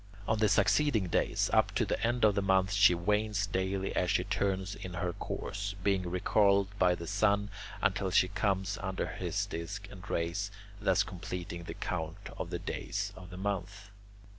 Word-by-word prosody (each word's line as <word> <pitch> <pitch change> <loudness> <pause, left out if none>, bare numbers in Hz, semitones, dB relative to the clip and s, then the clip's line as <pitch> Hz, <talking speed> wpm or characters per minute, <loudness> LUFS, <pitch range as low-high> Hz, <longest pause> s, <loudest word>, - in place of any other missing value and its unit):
On 110 -1 +1
the 110 -1 +4
succeeding 105 +1 +3
days, - - +1
up - - +3
to - - +2
the - - -2
end 120 0 +2
of 105 - +5
the 100 - +1
month, 95 0 +3
she 100 -3 +6
wanes 105 +3 +1
daily 95 0 -1
as - - +1
she - - +2
turns 95 0 -1
in 90 -3 -7
her 90 0 -1
course, 100 +3 -4
being 95 -3 +1
recalled 100 +2 +3
by 90 -1 +4
the 85 - -7
sun 100 +1 +2 0.3
until 100 -1 +1
she 90 - +4
comes 100 +1 0
under 95 -1 -2
his - - -2
disc 100 +5 -5
and 100 +1 -11
rays, 85 +5 -1 0.3
thus 95 -2 +3
completing 85 -2 -6
the - - -6
count 90 +3 -4
of 85 - -4
the 90 - -2
days - - -3
of 90 -1 -11
the 90 - -9
month. 100 +1 -4
95 Hz, 180 wpm, -32 LUFS, 90-100 Hz, 0.3 s, she